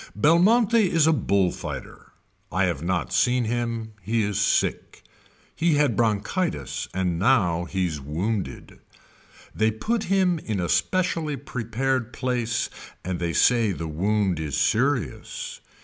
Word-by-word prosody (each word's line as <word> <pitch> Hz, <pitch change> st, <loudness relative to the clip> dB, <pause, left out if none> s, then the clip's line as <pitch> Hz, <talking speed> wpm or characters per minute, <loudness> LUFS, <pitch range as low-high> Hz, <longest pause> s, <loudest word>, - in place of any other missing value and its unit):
Belmonte 185 Hz, -, +4 dB, 0.2 s
is 165 Hz, -2 st, +4 dB
a 160 Hz, -, +4 dB
bull 100 Hz, -, +1 dB
fighter. -, -, -8 dB, 0.4 s
I -, -, +1 dB
have 70 Hz, -, -1 dB
not 85 Hz, +1 st, -1 dB
seen 125 Hz, 0 st, +3 dB
him. 115 Hz, -1 st, -2 dB
He 110 Hz, +1 st, 0 dB
is 105 Hz, 0 st, -1 dB
sick. 110 Hz, -, 0 dB, 0.5 s
He 165 Hz, -2 st, +2 dB
had 145 Hz, -6 st, +2 dB
bronchitis 115 Hz, -, -1 dB
and 90 Hz, -3 st, -1 dB
now 90 Hz, -7 st, +2 dB
he's 90 Hz, -4 st, -2 dB
wounded. 90 Hz, +9 st, -4 dB, 0.7 s
They 110 Hz, 0 st, +2 dB
put 215 Hz, -, -2 dB
him 185 Hz, -3 st, +2 dB
in 110 Hz, -8 st, -3 dB
a 85 Hz, -2 st, -2 dB
specially 155 Hz, -, 0 dB
prepared 125 Hz, -1 st, -2 dB
place 125 Hz, -3 st, -1 dB, 0.4 s
and 90 Hz, -1 st, -3 dB
they 85 Hz, -1 st, -2 dB
say 115 Hz, 0 st, +3 dB
the 85 Hz, -1 st, -5 dB
wound 95 Hz, +2 st, 0 dB
is 75 Hz, -3 st, -3 dB
serious. 130 Hz, +1 st, -1 dB
110 Hz, 135 wpm, -24 LUFS, 95-140 Hz, 0.7 s, Belmonte